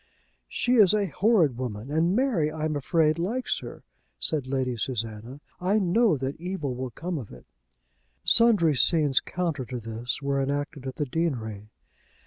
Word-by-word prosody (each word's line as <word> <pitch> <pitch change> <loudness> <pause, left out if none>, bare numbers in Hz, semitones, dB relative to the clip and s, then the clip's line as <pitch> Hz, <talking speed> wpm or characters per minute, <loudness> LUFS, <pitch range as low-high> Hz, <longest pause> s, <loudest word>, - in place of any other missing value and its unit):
"She 250 0 +1
is 210 -2 +6
a 205 -1 +1
horrid 175 - +2
woman, 120 0 -5
and 165 +5 +2
Mary. 230 - +1
I 155 0 -3
am 155 -1 -1
afraid, 155 +2 +1
likes 230 +9 -1
her," - - -10 0.3
said 145 -5 0
Lady 130 -2 -1
Susanna. 115 +2 -5 0.2
"I 190 +4 +1
know 200 -1 +3
that 135 +4 -5
evil 180 -7 -3
will 130 +1 -4
come 170 +6 -4
of 115 - -9
it." 60 - -13 0.8
Sundry 210 -10 +5
scenes 150 -1 +4
counter 170 -6 -3
to 125 +1 -5
this 115 +2 -4
were 140 -1 -1
enacted 140 0 -3
at 130 - -5
the 150 - -2
deanery. 115 -9 -3
150 Hz, 160 wpm, -26 LUFS, 130-180 Hz, 0.8 s, is